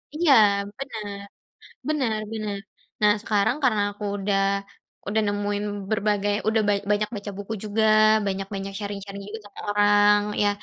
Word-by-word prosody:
Iya 325 Hz, -2 st, +3 dB, 0.5 s
benar, 215 Hz, -7 st, -6 dB, 0.7 s
benar 250 Hz, -8 st, 0 dB
benar, 215 Hz, -2 st, -3 dB, 0.4 s
nah 210 Hz, 0 st, +6 dB
sekarang 210 Hz, +2 st, +1 dB
karena 215 Hz, -5 st, +3 dB
aku 205 Hz, +1 st, -10 dB
udah 195 Hz, 0 st, 0 dB, 0.7 s
udah 220 Hz, +2 st, +1 dB
nemuin 205 Hz, 0 st, -1 dB, 0.3 s
berbagai 205 Hz, -1 st, +1 dB
udah 220 Hz, 0 st, +3 dB, 0.3 s
banyak 210 Hz, 0 st, +1 dB
baca 205 Hz, 0 st, -6 dB
buku 205 Hz, +2 st, -5 dB
juga 215 Hz, +1 st, 0 dB, 0.4 s
banyak-banyak 195 Hz, 0 st, -3 dB
sharing-sharing 200 Hz, -1 st, -6 dB
juga 220 Hz, +2 st, -7 dB
sama -, -, -14 dB
orang 205 Hz, 0 st, +5 dB, 0.2 s
ya, 205 Hz, -, +4 dB
205 Hz, 130 wpm, -24 LUFS, 205-215 Hz, 0.7 s, nah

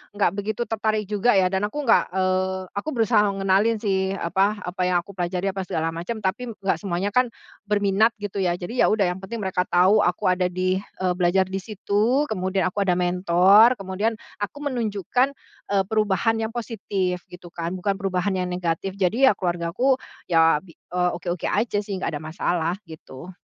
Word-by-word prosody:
nggak 200 Hz, -4 st, +2 dB
begitu 205 Hz, +3 st, -2 dB
tertarik 215 Hz, -1 st, -1 dB
juga 210 Hz, +2 st, +2 dB
ya 185 Hz, -1 st, +3 dB
dan 195 Hz, +2 st, 0 dB
aku 295 Hz, +6 st, -5 dB
nggak 235 Hz, -4 st, +5 dB
eee, 185 Hz, 0 st, +1 dB
aku 200 Hz, +10 st, -3 dB
berusaha 225 Hz, -2 st, +3 dB
ngenalin 195 Hz, +4 st, +2 dB
sih 190 Hz, -2 st, 0 dB
apa 195 Hz, +4 st, +1 dB
apa 180 Hz, +1 st, -5 dB
yang 180 Hz, -, +2 dB
aku 200 Hz, -, -12 dB
pelajari 180 Hz, +1 st, -2 dB
apa 195 Hz, -, -4 dB
segala 160 Hz, 0 st, -1 dB
macam, 175 Hz, +8 st, -5 dB
tapi 215 Hz, +6 st, -2 dB
nggak 195 Hz, -4 st, 0 dB
semuanya 190 Hz, +2 st, -2 dB
kan 250 Hz, +2 st, +4 dB, 0.4 s
berminat 205 Hz, +2 st, +2 dB
gitu 205 Hz, -1 st, -4 dB
ya. 175 Hz, -2 st, +1 dB
Jadi 185 Hz, +8 st, -6 dB
ya -, -, +5 dB
udah 210 Hz, -2 st, +2 dB
yang 185 Hz, -, -10 dB
penting 225 Hz, +5 st, -6 dB
mereka 185 Hz, -1 st, -1 dB
tahu 185 Hz, +4 st, +4 dB
aku 180 Hz, -2 st, 0 dB
ada 180 Hz, 0 st, +1 dB
di 185 Hz, +1 st, 0 dB
eee, 185 Hz, -2 st, -3 dB
belajar 180 Hz, +1 st, +2 dB
di 190 Hz, +1 st, -4 dB
situ, 215 Hz, +6 st, 0 dB
kemudian 190 Hz, -1 st, 0 dB
aku 200 Hz, +2 st, -2 dB
ada 180 Hz, -, +3 dB
mentor, 180 Hz, +6 st, +5 dB
kemudian 195 Hz, +4 st, -2 dB, 0.3 s
aku 205 Hz, +7 st, -4 dB
menunjukkan, 245 Hz, +1 st, 0 dB, 0.3 s
eee, 200 Hz, -1 st, +2 dB
perubahan 215 Hz, +1 st, +1 dB
yang 220 Hz, -, -1 dB
positif 195 Hz, -6 st, -2 dB
gitu 175 Hz, -1 st, -12 dB
kan, 170 Hz, +1 st, -4 dB
bukan 195 Hz, +2 st, 0 dB
perubahan 195 Hz, 0 st, -1 dB
yang 180 Hz, -1 st, -1 dB
negatif. 180 Hz, +2 st, -2 dB
Jadi 215 Hz, +8 st, +3 dB
ya -, -, +2 dB
keluargaku, 180 Hz, +9 st, 0 dB, 0.3 s
ya 165 Hz, -2 st, +4 dB
bi 170 Hz, -4 st, -16 dB
eee, 180 Hz, 0 st, -2 dB
oke-oke 175 Hz, -1 st, -4 dB
aja 210 Hz, 0 st, 0 dB
sih 200 Hz, -, -6 dB
nggak -, -, -2 dB
ada -, -, -10 dB
masalah 170 Hz, +2 st, -1 dB
gitu. 160 Hz, +2 st, -11 dB
190 Hz, 185 wpm, -23 LUFS, 180-210 Hz, 0.4 s, nggak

